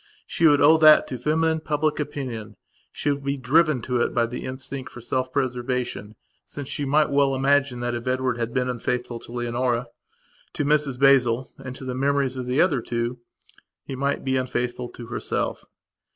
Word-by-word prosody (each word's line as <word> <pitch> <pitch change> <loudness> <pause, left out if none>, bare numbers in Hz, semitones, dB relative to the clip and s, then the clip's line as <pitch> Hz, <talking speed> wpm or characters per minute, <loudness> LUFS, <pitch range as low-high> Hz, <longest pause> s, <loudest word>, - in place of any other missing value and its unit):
She 165 - +2
would 145 -2 +4
owe 155 +3 +7
that 155 -1 +7
to 130 - -4
feminine 160 +1 +1
public 155 0 -1
opinion; 125 -8 -5 0.4
she 145 - -1
would 140 0 -3
be 140 +1 -1
driven 145 0 +2
to 125 0 0
it - - -1
by 120 -1 +3
the 120 +2 -6
instinct 130 0 -6
for - - -10
self 130 +2 -2
preservation, 125 -4 -2 0.3
since 145 -2 -8
she 145 - -3
might 150 +2 +2
well 140 -1 +3
imagine 135 -2 +2
that 120 0 -1
if 120 +1 -5
Edward 130 -1 0
had 115 0 -2
been 125 0 0
unfaithful 125 -1 -3
to - - -12
Leonora, 120 0 -1 0.6
to 145 - -2
Mrs 145 -3 +1
Basil 130 -3 +4
and 130 -1 -7
to 130 - -8
the 130 - -3
memories 135 0 0
of 125 -1 -5
the 125 +3 0
other 145 -9 +3
two, 120 +1 -3 0.6
he 135 - -6
might 140 +2 -1
be 130 0 +1
unfaithful 125 -1 -2
to 120 - -10
herself. 115 - -3
130 Hz, 185 wpm, -24 LUFS, 120-140 Hz, 0.6 s, owe